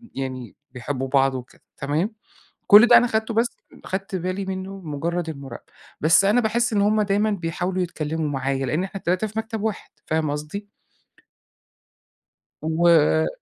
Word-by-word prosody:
يعني 130 -2 -5 0.2
بيحبّوا 130 +1 -4
بعض 135 0 +2
وكده، 125 -1 -9 0.2
تمام؟ 155 +10 -1 0.5
كل 210 +4 +9
ده 240 - +8
أنا 245 +1 +4
خدته 220 0 -1
بس 230 +2 0 0.3
أخدت 195 +2 -4
بالي 185 +2 -3
منّه 190 +1 -5
مُجرّد 165 +2 -3
المراقبة. 140 -5 -9 0.3
بس 165 +6 +5
أنا 215 +5 +4
باحس 235 +2 0
إن 205 - +2
هم 215 +1 +3
دايمًا 205 +1 +1
بيحاولوا 180 0 -2
يتكلّموا 160 -2 -3
معايا، 135 -1 -1
لإن 155 +8 -1
إحنا 195 +1 -6
ال3 185 +4 0
في 215 +1 -4
مكتب 220 -1 -4
واحد، 220 -2 -3 0.2
فاهم 155 -2 0
قصدي؟ 155 +8 -6 1.9
و 160 -1 +3
180 Hz, 150 wpm, -23 LUFS, 150-205 Hz, 1.9 s, كل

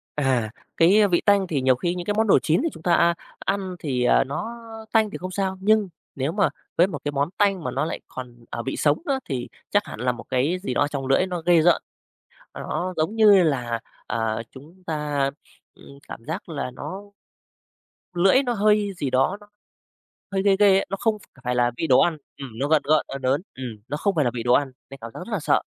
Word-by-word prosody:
À, 130 -6 0 0.3
cái 200 +5 +5
vị 175 -2 +2
tanh 200 -2 +4
thì 145 -5 -1
nhiều 130 -1 +4
khi 175 +7 -2
những 175 -1 -5
cái 205 - 0
món 220 0 +2
đồ - - +6
chín 160 +1 +1
thì 330 - +1
chúng 160 - -13
ta, 175 -1 +2
a, 170 0 +4 0.3
ăn 195 -2 -2
thì 125 -5 0 0.2
nó 140 +11 -4 0.4
tanh 220 -2 +3
thì - - -6
không 185 +1 -6
sao. 190 0 -2
Nhưng 210 -1 +3 0.3
nếu 135 +3 -1
mà 200 0 +2 0.3
với 175 +3 +5
một - - -5
cái 145 - 0
món 145 +2 0
tanh 195 -5 +2
mà - - -2
nó - - -1
lại - - -4
còn, 120 -2 -10
ờ, 115 - -5
vị 135 - -3
sống 150 +1 +3
á, 270 -2 0
thì 125 -3 -3 0.2
chắc 205 0 +2
hẳn - - -9
là 125 0 +1
một 125 - -9
cái 135 +8 +1
gì 125 - -2
đó - - 0
ở 145 - +3
trong 140 -3 -4
lưỡi 135 +7 +3
nó 180 -2 -4
ghê 175 -2 +5
rợn. 175 +2 +4 0.7
Nó 185 +1 -3
giống 160 +8 0
như 205 -4 +6
là, 120 -7 0 0.3
ờ, 115 0 -1
chúng 160 +8 -15
ta, 150 -3 -1 0.5
ừm, 140 0 -15
cảm 115 - -9
giác 160 +2 -5
là 140 -5 -4
nó 190 +9 -7 1.1
lưỡi 195 +10 +4
nó 245 -1 -1
hơi 210 -1 +2
gì 140 - -2
đó, 135 +10 +1
nó 205 - -16 0.8
hơi 195 0 0
ghê 200 -1 +4
ghê 200 -2 +6
ấy, - - 0
nó 195 - -3
không 220 -2 +1
ph 140 - -21
phải 125 0 -1
là 120 0 +2
vị 165 - -1
đồ 130 - +6
ăn, 170 -2 +2 0.2
ừm, 135 -2 -7
nó 140 - 0
gợn 155 -1 +4
gợn, 155 +1 +3
ớn 135 - -6
ớn. 130 +5 +1
Ừm, 125 -4 -6
nó 145 +2 -3
không 200 +2 0
phải 150 -4 +2
là 120 - +1
vị 115 -2 -4
đồ 125 0 +3
ăn 140 0 +2 0.2
nên 135 - -9
cảm 115 - -7
giác - - -8
rất 185 +6 -8
là 210 - 0
sợ. - - +2
160 Hz, 240 wpm, -24 LUFS, 130-195 Hz, 1.1 s, đồ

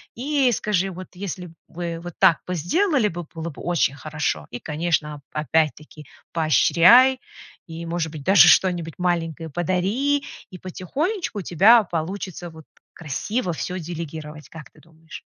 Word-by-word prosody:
И 275 +1 +1
скажи: 195 -4 0
"Вот, 185 +1 -9
если 180 -1 -6
б 160 - -15
вы 170 -1 -5
вот 175 0 -8
так 165 - +5
бы 180 - -2
сделали 275 - +1
бы, 175 -3 -5
было 165 0 -5
бы 145 - -11
очень 165 -5 +1
хорошо". 150 - -3
И, 120 - -6
конечно, 150 -2 -2
опять-таки 155 0 -1 0.3
поощряй 175 - +5 0.5
и, 165 0 -7
может 165 -2 -2
быть, 155 -3 -8
даже 195 +4 +7
что-нибудь 175 -4 +3
маленькое 165 -2 -2
подари, 195 - 0 0.3
и 185 - -9
потихонечку 275 - -3
у - - -3
тебя 210 +7 +5
получится, 175 +1 -5
вот, 160 -1 -14 0.3
красиво 180 - -3
всё 180 +5 -4
делегировать. 155 -2 -7
Как 155 -5 -11
ты 155 - -21
думаешь? 160 0 -13
170 Hz, 150 wpm, -23 LUFS, 160-195 Hz, 0.5 s, даже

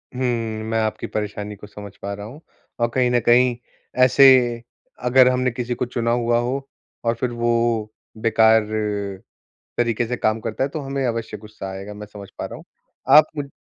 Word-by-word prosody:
हुँ, 115 -4 -2
मैं 115 0 +1
आपकी 110 -1 -2
परेशानी 105 0 -4
को 105 +1 -12
समझ 105 -1 -11
पा 100 0 -4
रहा 100 0 -7
हूँ 140 +9 -11 0.4
और 120 - +2
कहीं 125 -1 +2
न 120 - +3
कहीं 120 +1 +5 0.5
ऐसे 130 +2 +6 0.8
अगर 125 +1 +5
हमने 125 0 +1
किसी 120 0 -3
को 125 - -2
चुना 120 -1 -1
हुआ 120 0 +2
हो 135 +3 -3 0.4
और 115 - +3
फिर 120 +1 -2
वो 120 0 -1 0.7
बेकार, 110 0 +4 1.2
तरीके 120 -1 +1
से 125 +1 -3
काम 110 0 0
करता 115 +3 -3
है, 140 - -1
तो 155 - -4
हमें 135 -1 -3
अवश्य 115 -2 -3
गुस्सा 105 -2 -9
आएगा, 100 +2 -7
मैं 105 0 -9
समझ 100 -2 -11
पा - - -3
रहा - - -8
हूँ। - - -13 0.5
आप 155 - +9
मु 140 -1 -3
115 Hz, 185 wpm, -22 LUFS, 110-125 Hz, 1.2 s, आप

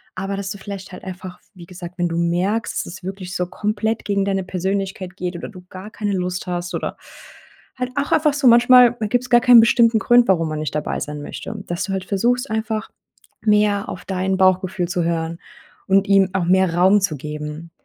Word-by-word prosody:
Aber 195 +1 -4
dass 195 -1 -4
du 200 - -7
vielleicht 195 0 -8
halt - - -10
einfach 185 -1 -8 0.2
wie 175 -2 -12
gesagt, 180 0 -10
wenn 175 -1 0
du 165 - -3
merkst, 180 +6 -1
dass 190 +2 -10
wirklich 190 0 -6
so 180 -1 -1
komplett 215 +3 -2
gegen 200 -1 0
deine 195 -1 -1
Persönlichkeit 190 0 -3
geht 180 -1 -4
oder 170 - -6
du 185 -4 -13
gar 190 +3 -9
keine 205 -2 -3
Lust 180 -1 -3
hast, 175 0 -3
oder - - -4 0.8
halt 250 0 -2
auch 285 0 -2
einfach 300 -2 +3
so. 285 -2 -2
Manchmal, 245 0 +7
da 215 - -1
gibt's 245 +3 -1
gar 240 0 +6
keinen 245 -1 +8
bestimmten 230 0 +4
Grund, 240 +1 +4
warum 165 -4 +2
man 155 0 -4
nicht 155 -1 -4
dabei 150 - -2
sein 150 0 -5
möchte, 200 - -7
dass 175 +1 -3
du 195 - -4
halt 190 -1 -3
versuchst, 240 +7 0
einfach 220 0 -2 0.5
mehr 210 -1 +2
auf 180 - -8
dein 190 0 -1
Bauchgefühl 185 -1 +2
zu 175 -1 -1
hören 165 0 -2 0.5
und 195 +1 +3
ihm 195 -1 +4
auch 190 -2 0
mehr 185 -1 +3
Raum 190 +4 +4
zu 170 -6 0
geben. 150 +3 -7
190 Hz, 205 wpm, -20 LUFS, 180-210 Hz, 0.8 s, keinen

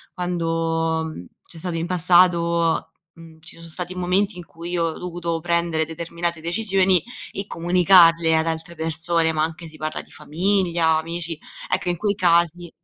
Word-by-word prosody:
quando, 165 -2 -1
uhm, 155 - -8 0.2
c’è 170 - -8
stato 175 0 -4
in 165 +1 -2
passato 170 -2 +3 0.2
uhm, 165 -1 -15
ci 160 - -10
son 165 - -10
stati 180 +2 -4
momenti 185 +2 0
in 175 - -9
cui 170 +1 -9
io 170 -1 0
ho 160 - -3
dovuto 170 -2 -4
prendere 170 -1 0
determinate 170 +1 -3
decisioni 190 +1 +2 0.3
e 195 - -5
comunicarle 170 -2 +4
ad 160 +1 +1
altre 165 +1 -4
persone, 165 +1 0
ma 155 -1 0
anche 165 +1 -5
si 155 -1 -14
parla 155 0 -3
di - - -20
famiglia, 170 0 +1
amici, 165 0 -4 0.3
ecco, 180 - 0
in 175 - 0
quei 205 +2 0
casi 175 -2 +2
170 Hz, 165 wpm, -22 LUFS, 165-175 Hz, 0.3 s, comunicarle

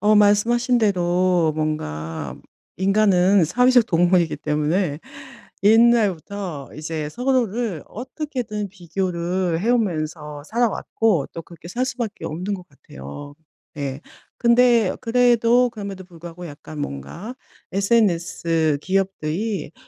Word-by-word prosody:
어 210 +2 +4
말씀하신 235 +4 +3
대로 180 -5 +2
뭔가 80 - -3 0.4
인간은 195 -1 +4
사회적 250 +7 +4
동물이기 175 -2 +2
때문에 150 +2 0 0.6
옛날부터 200 - +2
이제 155 0 -4
서로를 240 - -1
어떻게든 245 -4 -5
비교를 180 -1 -2
해오면서 160 -10 -1
살아왔고 225 - 0
또 - - -6
그렇게 170 0 -13
살 245 +8 -1
수밖에 235 -5 -4
없는 180 +6 -4
것 180 -2 -9
같아요. 135 - -11 0.4
예. 140 -1 -4 0.4
근데 235 -3 +4
그래도 240 0 +3
그럼에도 200 -4 -7
불구하고 175 0 -10
약간 150 0 -10
뭔가 145 - -6 0.4
SNS 170 -7 +1
기업들이 190 -1 -2
185 Hz, 255 characters per minute, -22 LUFS, 160-225 Hz, 0.6 s, 어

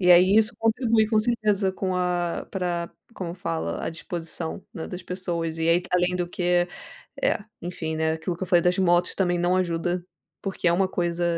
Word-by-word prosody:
E, 180 -1 +4
aí, 185 +4 +7
isso 220 +1 +4
contribui 225 -1 +3
com 220 -1 +2
certeza 215 -4 +2
com 185 -1 -2
a 175 -1 -1
pra 175 -3 -2 0.2
como 175 -2 -5
fala? 85 - -3
A - - -1
disposição, 165 0 -5
né, 160 - -5
das 180 0 -6
pessoas. 170 -3 -3
E, 165 +1 +1
aí 170 +1 +5
que 180 - -12
além 180 0 +2
do 175 - -1
que 175 0 +1 0.6
é, - - +3 0.2
enfim, 160 -2 -3
né, 160 0 +1
aquilo 170 +2 -3
que 185 - -9
eu - - -9
falei 175 -3 +5
das 180 +1 +2
motos 175 -1 +3
também 175 -2 +1
não 175 +1 +2
ajuda, 175 0 0 0.4
porque 190 -3 0
é - - +4
uma 190 +2 +3
coisa 175 -1 -1
180 Hz, 200 wpm, -25 LUFS, 170-190 Hz, 0.6 s, aí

